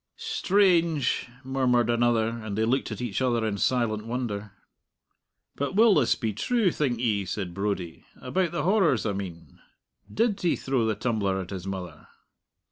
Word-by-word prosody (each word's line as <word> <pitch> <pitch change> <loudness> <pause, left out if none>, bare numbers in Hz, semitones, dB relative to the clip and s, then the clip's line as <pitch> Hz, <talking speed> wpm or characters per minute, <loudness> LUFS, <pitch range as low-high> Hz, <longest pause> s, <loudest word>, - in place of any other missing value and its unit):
"Strange!" 185 - +2 0.2
murmured 130 -3 +2
another; 120 -1 +2
and 110 -3 -5
they 110 - +2
looked 130 +4 0
at - - -5
each 115 -1 -2
other 120 -3 +1
in 105 -2 -1
silent 115 -3 0
wonder. 110 -4 -3 1.0
"But 140 +7 -3
will 220 0 +6
this 145 -9 +3
be 110 -2 -2
true, 215 - +1
think 135 -7 -1
ye?" 110 -5 +1
said 90 -1 -4
Brodie 100 -3 -3 0.2
"about 175 +6 -1
the 170 -4 -2
horrors, 180 - +2
I 105 - 0
mean. 90 -4 -7 0.5
Did 225 -2 0
he 175 - +2
throw 130 -4 0
the 110 - 0
tumbler 105 -4 -1
at 95 0 -6
his 95 -1 -6
mother?" 90 -5 -6
120 Hz, 160 wpm, -26 LUFS, 100-150 Hz, 1.0 s, will